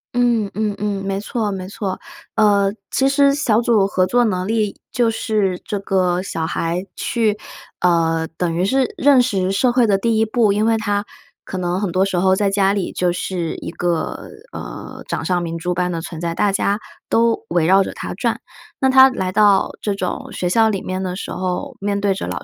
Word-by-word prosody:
嗯 235 Hz, -4 st, +2 dB
嗯 210 Hz, -1 st, -1 dB
嗯。 200 Hz, -1 st, -2 dB
没 195 Hz, 0 st, -1 dB
错 210 Hz, 0 st, -2 dB
没 185 Hz, -1 st, -5 dB
错。 195 Hz, -1 st, -4 dB, 0.4 s
呃， 200 Hz, -2 st, +3 dB, 0.2 s
其 270 Hz, 0 st, +2 dB
实 280 Hz, 0 st, +4 dB
小 235 Hz, -6 st, +2 dB
组 220 Hz, -5 st, +3 dB
合 185 Hz, -2 st, +1 dB
作 245 Hz, +7 st, +2 dB
能 185 Hz, -4 st, -1 dB
力， 215 Hz, -2 st, -1 dB
就 240 Hz, -2 st, +2 dB
是 210 Hz, -5 st, -1 dB
这 205 Hz, -, -3 dB
个 185 Hz, -2 st, +1 dB
小 165 Hz, -4 st, -3 dB
孩 170 Hz, +2 st, -2 dB
去， 220 Hz, -3 st, 0 dB, 0.4 s
呃， 165 Hz, -2 st, +2 dB
等 170 Hz, -2 st, -1 dB
于 175 Hz, -, 0 dB
是 260 Hz, +4 st, +1 dB
认 280 Hz, -2 st, +5 dB
识 195 Hz, -6 st, 0 dB
社 240 Hz, +6 st, +2 dB
会 245 Hz, -1 st, +3 dB
的 200 Hz, -, +3 dB
第 225 Hz, +3 st, +1 dB
一 220 Hz, -, +3 dB
步。 220 Hz, -2 st, +2 dB
因 210 Hz, +2 st, +1 dB
为 225 Hz, 0 st, +3 dB
他 205 Hz, -2 st, -1 dB, 0.4 s
可 185 Hz, -, -6 dB
能 180 Hz, +1 st, -1 dB
很 195 Hz, -, -1 dB
多 185 Hz, +2 st, +2 dB
时 195 Hz, -2 st, -2 dB
候 190 Hz, +1 st, +3 dB
在 200 Hz, 0 st, +1 dB
家 195 Hz, 0 st, +2 dB
里 200 Hz, -3 st, -2 dB
就 180 Hz, -1 st, +1 dB
是 175 Hz, -1 st, -3 dB
一 -, -, -6 dB
个， 170 Hz, -2 st, -2 dB, 0.2 s
呃， -, -, -8 dB
掌 -, -, -3 dB
上 180 Hz, -1 st, +1 dB
明 165 Hz, -1 st, -4 dB
珠 175 Hz, +2 st, -2 dB
般 180 Hz, 0 st, -1 dB
的 165 Hz, -, -2 dB
存 165 Hz, -1 st, -7 dB
在， 170 Hz, -1 st, -2 dB
大 205 Hz, -, +2 dB
家 200 Hz, +1 st, 0 dB, 0.3 s
都 230 Hz, 0 st, +2 dB
围 170 Hz, -2 st, +2 dB
绕 190 Hz, +3 st, +5 dB
着 -, -, -5 dB
他 -, -, -6 dB
转。 -, -, -1 dB, 0.4 s
那 265 Hz, -, +3 dB
他 265 Hz, 0 st, +8 dB
来 190 Hz, -7 st, -3 dB
到 205 Hz, -1 st, +4 dB
这 205 Hz, -, -1 dB
种 185 Hz, -2 st, -4 dB
学 180 Hz, -, -2 dB
校 220 Hz, +5 st, +3 dB
里 195 Hz, -3 st, -2 dB
面 185 Hz, 0 st, -3 dB
的 185 Hz, -1 st, -3 dB
时 -, -, -6 dB
候， 185 Hz, -1 st, -3 dB
面 200 Hz, 0 st, -1 dB
对 200 Hz, -1 st, +1 dB
着 190 Hz, -, -5 dB
老 -, -, -4 dB
195 Hz, 225 characters per minute, -19 LUFS, 180-220 Hz, 0.4 s, 他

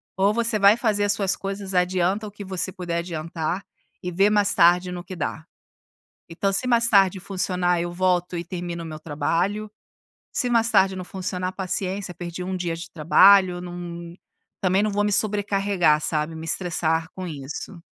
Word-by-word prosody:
ou 195 Hz, +2 st, +2 dB
você 230 Hz, 0 st, +1 dB
vai 200 Hz, +2 st, +6 dB
fazer 215 Hz, -4 st, +1 dB
as 205 Hz, -, +2 dB
suas 200 Hz, -1 st, +1 dB
coisas, 195 Hz, 0 st, -5 dB
adianta 180 Hz, +3 st, +1 dB
o 210 Hz, -, -8 dB
que 205 Hz, 0 st, -9 dB
você 190 Hz, 0 st, -2 dB
puder 175 Hz, -3 st, -3 dB
adiantar, 165 Hz, +1 st, -4 dB, 0.4 s
e 180 Hz, -, -4 dB
vê 195 Hz, +4 st, +3 dB
mais 205 Hz, -1 st, +2 dB
tarde 175 Hz, +1 st, +4 dB
no 175 Hz, -1 st, -6 dB
que 185 Hz, -, -8 dB
dá. 160 Hz, 0 st, -4 dB, 0.8 s
Então, 175 Hz, +4 st, -1 dB
se 195 Hz, +6 st, 0 dB
mais 235 Hz, -2 st, +3 dB
tarde 195 Hz, -3 st, +4 dB
funcionar 180 Hz, -2 st, 0 dB
eu 175 Hz, 0 st, -3 dB
volto 180 Hz, 0 st, 0 dB
e 170 Hz, -, -4 dB
termino 175 Hz, -1 st, -5 dB
o -, -, -7 dB
meu 155 Hz, -1 st, -7 dB
trabalho, 170 Hz, +8 st, -2 dB, 0.6 s
se 250 Hz, -, 0 dB
mais 230 Hz, -1 st, +2 dB
tarde 190 Hz, -2 st, +3 dB
não 185 Hz, -, -5 dB
funcionar 185 Hz, 0 st, -4 dB
paciência, 190 Hz, 0 st, -3 dB
perdi 175 Hz, +1 st, -6 dB
1 185 Hz, +1 st, -3 dB
dia 175 Hz, -2 st, -2 dB
de 165 Hz, 0 st, -8 dB
trabalho, 180 Hz, +3 st, +5 dB
não, 175 Hz, -1 st, -7 dB, 0.5 s
também 190 Hz, +1 st, +2 dB
não 215 Hz, -, +1 dB
vou 205 Hz, +1 st, 0 dB
me 205 Hz, -, 0 dB
sobrecarregar 195 Hz, -6 st, +2 dB
sabe, 155 Hz, +1 st, -1 dB
me 160 Hz, 0 st, -7 dB
estressar 165 Hz, -1 st, 0 dB
com 185 Hz, -1 st, -6 dB
isso. 155 Hz, +4 st, -7 dB
185 Hz, 180 wpm, -23 LUFS, 170-200 Hz, 0.8 s, vai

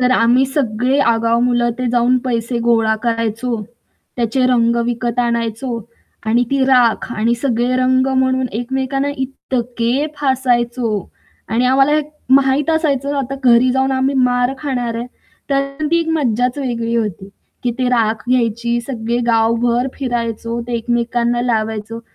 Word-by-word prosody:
तर 250 Hz, 0 st, +3 dB
आम्ही 245 Hz, +2 st, +4 dB
सगळे 260 Hz, -1 st, 0 dB
आगाव 230 Hz, +1 st, +1 dB
मुलं 240 Hz, -1 st, +2 dB
ते 255 Hz, -, -1 dB
जाऊन 245 Hz, +1 st, +3 dB
पैसे 235 Hz, -1 st, -1 dB
गोळा 225 Hz, -2 st, +3 dB
करायचो, 230 Hz, 0 st, -1 dB, 0.5 s
त्याचे 240 Hz, +2 st, 0 dB
रंग 235 Hz, -2 st, +2 dB
विकत 240 Hz, 0 st, -2 dB
आणायचो 235 Hz, +1 st, -2 dB, 0.5 s
आणि 235 Hz, +3 st, +2 dB
ती 275 Hz, -1 st, +2 dB
राख 250 Hz, -4 st, +3 dB
आणि 230 Hz, +1 st, +1 dB
सगळे 245 Hz, -1 st, +1 dB
रंग 255 Hz, 0 st, +2 dB
म्हणून 260 Hz, 0 st, +1 dB
एकमेकांना 265 Hz, +4 st, -2 dB
इतके 250 Hz, 0 st, -2 dB
फासायचो 245 Hz, -6 st, 0 dB, 0.4 s
आणि 230 Hz, +3 st, +1 dB
आम्हाला 270 Hz, +3 st, +4 dB, 0.4 s
माहीत 275 Hz, +2 st, +3 dB
असायचं 285 Hz, -3 st, 0 dB
आता 275 Hz, 0 st, -3 dB
घरी 245 Hz, +1 st, +5 dB
जाऊन 265 Hz, +1 st, +1 dB
आम्ही 265 Hz, +1 st, +1 dB
मार 250 Hz, 0 st, +2 dB
खाणार 250 Hz, -5 st, -2 dB
आहे 235 Hz, +1 st, -4 dB, 0.4 s
तर 275 Hz, +2 st, -1 dB
ती 335 Hz, 0 st, +3 dB
एक 330 Hz, -, -3 dB
मज्जाच 250 Hz, -3 st, 0 dB
वेगळी 235 Hz, -4 st, -2 dB
होती 200 Hz, -4 st, -3 dB, 0.4 s
की 245 Hz, -, +2 dB
ती 255 Hz, -1 st, +1 dB
राख 225 Hz, -2 st, +1 dB
घ्यायची, 235 Hz, -1 st, +1 dB
सगळे 235 Hz, -1 st, -3 dB
गावभर 235 Hz, +2 st, +2 dB
फिरायचो, 235 Hz, -2 st, -3 dB
ते 245 Hz, -, -5 dB
एकमेकांना 240 Hz, +1 st, 0 dB
लावायचो. 220 Hz, -1 st, -2 dB
245 Hz, 140 wpm, -17 LUFS, 230-260 Hz, 0.5 s, घरी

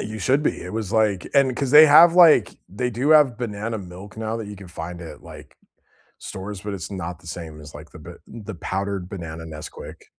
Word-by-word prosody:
You 110 Hz, +1 st, -6 dB
should 130 Hz, +9 st, +1 dB
be. -, -, -2 dB
It 90 Hz, -, -8 dB
was 110 Hz, -2 st, -4 dB
like 105 Hz, -4 st, +1 dB
and 135 Hz, -2 st, +3 dB
'cause 135 Hz, -1 st, -2 dB
they 150 Hz, +2 st, +9 dB
have, 165 Hz, +3 st, +7 dB
like, 165 Hz, -, +5 dB
they 125 Hz, +6 st, -3 dB
do 125 Hz, +6 st, -1 dB
have 145 Hz, -6 st, +5 dB
banana 110 Hz, -1 st, -4 dB
milk 95 Hz, +2 st, -11 dB
now 110 Hz, 0 st, -3 dB
that 115 Hz, -2 st, -6 dB
you 105 Hz, 0 st, -9 dB
can 95 Hz, -1 st, -12 dB
find 85 Hz, +1 st, -8 dB
at, 85 Hz, -, -11 dB
like, -, -, -13 dB, 0.6 s
stores, 95 Hz, 0 st, -8 dB
but 105 Hz, 0 st, -5 dB
it's 90 Hz, -4 st, -6 dB
not 90 Hz, -3 st, -6 dB
the 85 Hz, -, -16 dB
same 80 Hz, -2 st, -8 dB
as, 75 Hz, 0 st, -13 dB
like, -, -, -11 dB
the -, -, -13 dB
ba -, -, -11 dB
the 110 Hz, -3 st, -9 dB
powdered 95 Hz, +1 st, -4 dB
banana 80 Hz, -4 st, -7 dB
Nesquik. 75 Hz, -1 st, -10 dB
105 Hz, 220 wpm, -22 LUFS, 90-120 Hz, 0.6 s, they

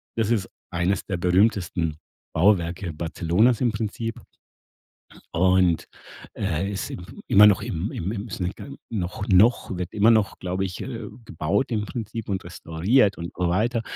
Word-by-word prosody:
das 115 Hz, 0 st, 0 dB
ist 105 Hz, -5 st, +1 dB, 0.2 s
eines 90 Hz, +3 st, 0 dB
der 95 Hz, -3 st, -2 dB
berühmtesten 90 Hz, -3 st, +1 dB, 0.4 s
Bauwerke 85 Hz, -1 st, +2 dB
Barcelonas 85 Hz, +8 st, +1 dB
im 120 Hz, -3 st, +1 dB
Prinzip. 115 Hz, +1 st, -4 dB, 1.1 s
Und, 90 Hz, -1 st, +3 dB, 0.5 s
äh, 95 Hz, 0 st, -1 dB
ist 95 Hz, -3 st, -4 dB
im 90 Hz, -, -7 dB, 0.2 s
immer 105 Hz, +1 st, +7 dB
noch 100 Hz, -2 st, +5 dB
im 90 Hz, +5 st, -3 dB
im 95 Hz, +5 st, -3 dB
ims 105 Hz, -3 st, -6 dB, 0.5 s
noch 100 Hz, -1 st, -3 dB
noch 100 Hz, 0 st, +4 dB
wird 90 Hz, -1 st, -4 dB
immer 110 Hz, +2 st, +4 dB
noch, 110 Hz, -3 st, +2 dB
glaube 95 Hz, +1 st, -2 dB
ich, 90 Hz, -2 st, -5 dB
äh, 120 Hz, -3 st, -5 dB, 0.2 s
gebaut 85 Hz, +12 st, -1 dB
im 105 Hz, -2 st, 0 dB
Prinzip 115 Hz, 0 st, -6 dB
und 95 Hz, -1 st, -1 dB
restauriert 90 Hz, +6 st, +1 dB
und 85 Hz, 0 st, -6 dB
so 90 Hz, -1 st, 0 dB
weiter. 115 Hz, +6 st, +1 dB
95 Hz, 145 wpm, -24 LUFS, 90-110 Hz, 1.1 s, immer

